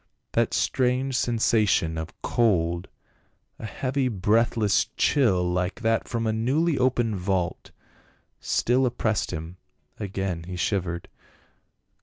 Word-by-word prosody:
That - - +1
strange 130 +1 +1
sensation 110 -8 +2
of 80 0 -6
cold, 85 -7 +1 0.7
a 110 - -5
heavj' 130 -3 -2
breathless 110 +1 +2
chill 110 -11 +3
like 90 +5 -2
that 115 -1 +1
from 115 -1 -2
a 110 - +1
newly 140 +9 +1
opened 120 -4 +1
vault, 90 -1 -2 0.7
still 125 +2 +1
oppressed 110 -3 -1
him; 80 +1 -6 0.4
again 95 -4 -3
he 90 +1 -6
shivered. 85 -2 -2
110 Hz, 110 wpm, -25 LUFS, 90-120 Hz, 0.7 s, chill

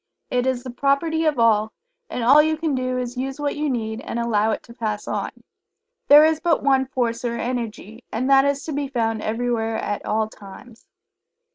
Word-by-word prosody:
It 250 0 +1
is 255 -2 -1
the 255 - -6
property 300 +5 0
of 305 -3 +1
all, 220 -2 +3 0.4
and 245 - -3
all 275 +6 +7
you 315 +1 0
can 315 -2 -1
do 255 -1 -1
is 245 -1 -3
to 250 - -4
use 270 +1 -5
what 290 -1 -1
you 300 0 -1
need, 225 -2 -3
and 235 - -5
allow 220 -2 +1
it - - -2
to 235 - -14
pass 215 -3 -4
on. - - -2 0.8
There 295 +2 +9
is 315 -1 +2
but 335 -1 +1
one 265 -1 +3
Force 240 -3 -2
or 235 -1 -2
Energy, 235 -2 -5
and 245 +4 -2
that 270 0 +6
is 280 0 0
to 315 - -4
be 285 0 -2
found 225 -4 -1
everywhere 225 0 -1
at 205 -1 -3
all 220 0 0
times. 220 +3 -14
250 Hz, 210 wpm, -22 LUFS, 225-275 Hz, 0.8 s, There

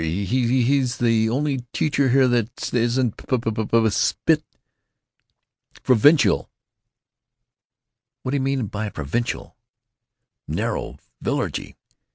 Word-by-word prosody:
He's—he's 125 - +1
the 115 -2 +2
only 140 +3 0
t 120 - -12
teacher 145 -3 +1
here 130 +1 +4
that 120 -2 -1
isn't 120 0 +1
p 130 - -1
p 115 -1 -2
p——" 110 +1 +1
"Spit!" - - +1 1.4
"——provincial!" 130 - +4 1.7
"What 130 - -3
d'you 140 - +1
mean 135 -2 0
by 105 +1 -4
'provincial'?" 80 - -4 0.9
"Narrow. - - -3 0.2
Villagey. - - -3
120 Hz, 100 wpm, -22 LUFS, 110-130 Hz, 1.7 s, here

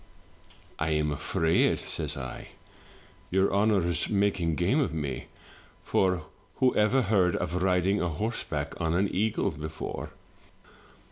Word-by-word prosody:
" - - -26
'I 80 - 0
am 75 -1 +1
afraid,' 80 +3 +2
says - - -2
I, 65 -2 -6 0.8
'your 95 +1 +2
honour's 100 -5 +2
making 100 -5 +1
game 95 - +2
of 135 - +1
me; 70 -4 -4 0.6
for 90 -3 +1 0.3
whoever 125 0 +3
heard 95 -4 +2
of 90 +3 -2
riding 95 +2 +2
a 90 - 0
horse 110 +9 -3
back 75 -2 -3
on 80 0 +1
an 95 +2 +1
eagle 110 +3 +1
before?' 80 +1 -6
90 Hz, 130 wpm, -28 LUFS, 80-100 Hz, 0.8 s, whoever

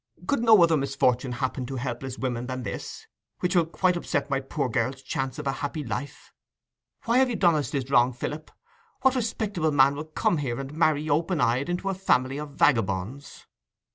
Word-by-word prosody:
Could 280 - +1
no 220 -6 +7
other 165 -2 +4
misfortune 135 -2 0
happen 130 0 -3
to 135 - -5
helpless 125 +1 -4
women 125 -2 -3
than 130 -1 -4
this, - - -6 0.3
which 180 +1 -1
will 170 -2 +4
quite 180 +2 +1
upset 145 -4 -2
my 135 - +2
poor 135 +1 -2
girl's 125 +3 -2
chance 135 +1 -3
of 150 - -6
a 135 - +1
happy 145 +3 -4
life? 125 +4 -6 0.7
Why 235 +2 +3
have 260 -1 +4
you 240 - -2
done 175 -4 +4
us 150 -2 -1
this 135 -2 -3
wrong, 120 -1 +5
Philip? 150 +5 -6 0.5
What 265 -1 +5
respectable 215 -9 -1
man 140 -1 +5
will 150 +2 -5
come 160 +2 0
here, 130 -5 -2
and 135 +1 -6
marry 155 -1 +2
open 160 +3 +1
eyed 130 +5 +1
into 180 +2 -2
a - - 0
family 135 -8 +1
of 150 0 -6
vagabonds? 115 +1 0
140 Hz, 195 wpm, -26 LUFS, 130-170 Hz, 0.7 s, no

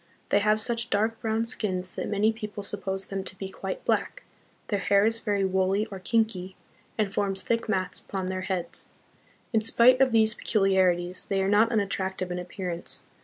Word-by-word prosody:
They 200 - +4
have 215 +1 +2
such 235 +1 -2
dark 220 +2 0
brown 225 0 0
skins 185 -6 -2
that - - -3
many 210 +2 +2
people 210 -2 -6
suppose 195 -1 -3
them 195 -1 -4
to 190 - -8
be 190 0 -5
quite - - -6
black; - - 0 0.5
their 205 - 0
hair 200 +1 +3
is 225 +1 +1
very 205 -3 0
woolly 190 +2 +1
or 195 - -6
kinky, 190 -2 -1 0.4
and 210 -3 0
forms 195 -1 0
thick 230 -1 -1
mats 185 -3 0
upon 190 -2 -4
their 185 0 -3
heads. 180 -3 -2 0.6
In 220 - +3
spite 240 +4 +6
of 265 -1 +5
these 220 -1 +4
peculiarities, 185 -5 +1
they 195 - 0
are - - 0
not 210 +3 +4
unattractive 190 -4 -1
in 180 - -2
appearance. 180 -1 -4
200 Hz, 180 wpm, -27 LUFS, 190-220 Hz, 0.6 s, spite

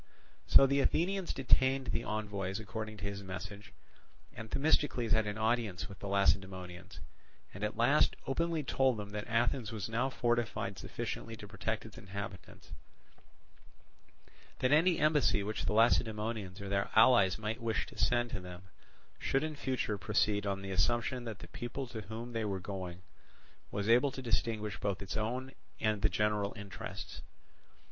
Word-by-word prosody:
So - - +8
the 140 +1 +2
Athenians 180 +6 +1
detained 130 -1 +2
the 115 - -1
envoys 100 -2 -3
according 110 +1 -5
to 95 - -10
his 100 0 -3
message, 95 +2 -7 0.6
and 110 0 -8
Themistocles 135 -5 +2
had 110 -1 +3
an 105 +1 -3
audience 110 -4 0
with 100 -2 -11
the 100 - -5
Lacedaemonians, 95 -2 0 0.5
and 100 - -7
at 105 0 -2
last 130 +6 +4
openly 165 +3 0
told 130 -2 +2
them 105 -1 -6
that 105 0 -4
Athens 120 0 +1
was 105 -3 -3
now 115 +4 0
fortified 120 -6 -1
sufficiently 115 -1 -5
to 105 -1 -10
protect 105 +3 -3
its 110 - -10
inhabitants; 95 -1 -8 1.9
that 130 - +1
any 165 +4 +5
embassy 150 -9 +3
which 105 +2 -3
the - - 0
Lacedaemonians 110 -3 +2
or 100 - -5
their 100 0 0
allies 110 -5 +6
might 110 +2 -3
wish 115 -3 0
to - - -13
send 120 -1 +1
to 105 - -3
them 90 0 -9 0.6
should 135 +2 +1
in 155 -1 -3
future 130 -7 -1
proceed 105 0 +1
on 95 0 -2
the 95 - -5
assumption 120 +7 +1
that 110 -3 -5
the - - -11
people 120 +3 -5
to 120 -3 -6
whom 115 +4 -7
they 115 -1 -1
were 100 -3 -1
going 90 -2 -6 0.7
was 100 0 -2
able 125 +5 +5
to 130 0 -7
distinguish 110 -3 -1
both 100 -1 -2
its 95 - -5
own 125 +5 -2 0.3
and 110 -2 +1
the 105 - +4
general 105 +1 +1
interests. 105 -3 -7
110 Hz, 160 wpm, -33 LUFS, 100-120 Hz, 1.9 s, So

